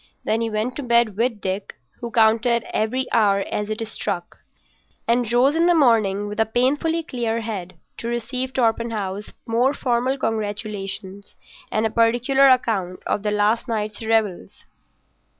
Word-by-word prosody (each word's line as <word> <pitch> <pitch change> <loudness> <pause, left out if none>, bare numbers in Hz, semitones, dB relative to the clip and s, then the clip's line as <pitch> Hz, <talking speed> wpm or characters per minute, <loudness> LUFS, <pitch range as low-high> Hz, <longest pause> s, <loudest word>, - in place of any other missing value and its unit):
Then 225 +1 0
he 230 - -1
went 220 +4 -2
to - - -3
bed 235 -4 +2
with 230 -1 -1
Dick, 190 +1 -4 0.2
who 235 - -5
counted 230 +1 +3
every 250 +5 0
hour 205 -3 +3
as 210 0 -2
it 220 +1 -2
struck, 200 -5 -5 0.7
and 235 -1 +1
rose 255 +5 +4
in 335 +1 +3
the 350 - +4
morning 220 -8 +3
with 210 +1 -6
a 220 - +4
painfully 290 +8 +1
clear 230 -5 -2
head 190 -5 -6 0.2
to 230 - -5
receive 240 +2 -2
Torpenhow's 225 -5 -1
more 245 +5 +1
formal 250 +2 0
congratulations 205 -3 -4 0.4
and 215 +1 +1
a 220 - 0
particular 245 +4 +4
account 215 -8 +1
of - - -1
the 210 - -1
last 210 +3 +1
night's 215 -1 -3
revels. 215 - -1
225 Hz, 150 wpm, -22 LUFS, 210-245 Hz, 0.7 s, rose